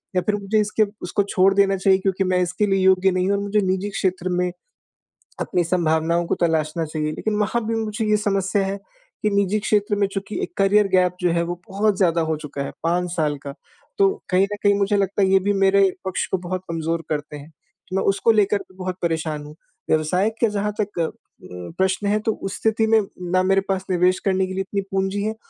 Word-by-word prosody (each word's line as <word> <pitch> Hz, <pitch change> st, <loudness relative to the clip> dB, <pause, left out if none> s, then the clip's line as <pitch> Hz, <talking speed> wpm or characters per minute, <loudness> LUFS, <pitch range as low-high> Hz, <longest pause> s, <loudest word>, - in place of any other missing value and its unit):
या 180 Hz, -, +3 dB
फिर 210 Hz, -, 0 dB
मुझे 205 Hz, +1 st, 0 dB
इसके 210 Hz, +1 st, +1 dB, 0.2 s
उसको 180 Hz, +3 st, 0 dB
छोड़ 195 Hz, +1 st, +4 dB
देना 195 Hz, -1 st, +3 dB
चाहिए 190 Hz, 0 st, +3 dB
क्योंकि 195 Hz, 0 st, 0 dB
मैं 185 Hz, -1 st, +1 dB
इसके 180 Hz, +4 st, 0 dB
लिए 195 Hz, -1 st, +1 dB
योग्य 190 Hz, 0 st, +4 dB
नहीं 185 Hz, +1 st, 0 dB
हूँ 200 Hz, -, +2 dB
और 200 Hz, -, -3 dB
मुझे 205 Hz, +1 st, +1 dB
निजी 190 Hz, +2 st, -1 dB
क्षेत्र 185 Hz, -2 st, -1 dB
में 180 Hz, 0 st, 0 dB, 0.9 s
अपनी 180 Hz, -1 st, 0 dB
संभावनाओं 170 Hz, 0 st, +1 dB
को -, -, +1 dB
तलाशना 160 Hz, -1 st, 0 dB
चाहिए। 155 Hz, 0 st, -3 dB
लेकिन 215 Hz, +5 st, -2 dB
वहाँ 220 Hz, +2 st, 0 dB
भी 225 Hz, -, 0 dB
मुझे 215 Hz, +1 st, -3 dB
ये 210 Hz, 0 st, +3 dB
समस्या 195 Hz, -1 st, 0 dB
है 195 Hz, +1 st, -3 dB, 0.5 s
कि 210 Hz, -, +3 dB
निजी 200 Hz, +1 st, +1 dB
क्षेत्र 205 Hz, 0 st, +1 dB
में, 200 Hz, -1 st, +2 dB
चूँकि 195 Hz, +1 st, -5 dB
एक -, -, -5 dB
करियर 200 Hz, +1 st, +4 dB
गैप 180 Hz, -1 st, +3 dB
जो 175 Hz, -1 st, +2 dB
है, 170 Hz, 0 st, +1 dB
वो 175 Hz, +1 st, -5 dB
बहुत 205 Hz, 0 st, +1 dB
ज़्यादा 170 Hz, -3 st, +2 dB
हो 160 Hz, -1 st, -1 dB
चुका 145 Hz, -2 st, -6 dB
है, -, -, -5 dB
5 175 Hz, +2 st, 0 dB
साल 150 Hz, -4 st, 0 dB
का, 140 Hz, -, -5 dB, 0.4 s
तो 395 Hz, -1 st, +5 dB, 0.2 s
कहीं 185 Hz, +1 st, +3 dB
न -, -, -1 dB
कहीं 205 Hz, -1 st, +5 dB
मुझे 200 Hz, +1 st, +2 dB
लगता 200 Hz, 0 st, 0 dB
है, 190 Hz, -, +4 dB
ये 190 Hz, 0 st, +5 dB
भी 200 Hz, +2 st, 0 dB
मेरे 195 Hz, 0 st, +4 dB, 0.2 s
पक्ष 190 Hz, -, -1 dB
को 190 Hz, -, +2 dB
बहुत 185 Hz, +1 st, -3 dB
कमज़ोर 165 Hz, 0 st, -2 dB
करते 150 Hz, -1 st, -3 dB
हैं। 145 Hz, +3 st, -13 dB, 0.4 s
मैं 190 Hz, -, +1 dB
उसको 200 Hz, +4 st, +3 dB
लेकर 210 Hz, -1 st, +3 dB
भी 185 Hz, -, -13 dB
बहुत 185 Hz, -1 st, -4 dB
परेशान 160 Hz, -3 st, -1 dB
हूँ। 150 Hz, +1 st, -11 dB, 0.3 s
व्यवसाय 170 Hz, +6 st, +2 dB
का 230 Hz, -, +5 dB
जहाँ 210 Hz, 0 st, -1 dB
तक 205 Hz, -3 st, -4 dB
अ, 165 Hz, -, +2 dB, 0.5 s
उम, 90 Hz, -, -8 dB
प्रश्न 190 Hz, +2 st, 0 dB
है, 210 Hz, +1 st, +2 dB
तो 220 Hz, +1 st, 0 dB
उस 195 Hz, -2 st, -6 dB
स्थिति 220 Hz, 0 st, +1 dB
में, 225 Hz, 0 st, +5 dB, 0.3 s
ना 185 Hz, 0 st, +3 dB
मेरे 195 Hz, +1 st, +3 dB
पास 190 Hz, -1 st, -1 dB
निवेश 180 Hz, +1 st, +3 dB
करने 190 Hz, -1 st, +1 dB
के 185 Hz, -, -6 dB
लिए 190 Hz, -, -1 dB
इतनी 200 Hz, +1 st, -2 dB
पूँजी 195 Hz, +1 st, -1 dB
है 215 Hz, +1 st, -2 dB
190 Hz, 225 wpm, -22 LUFS, 175-200 Hz, 0.9 s, तो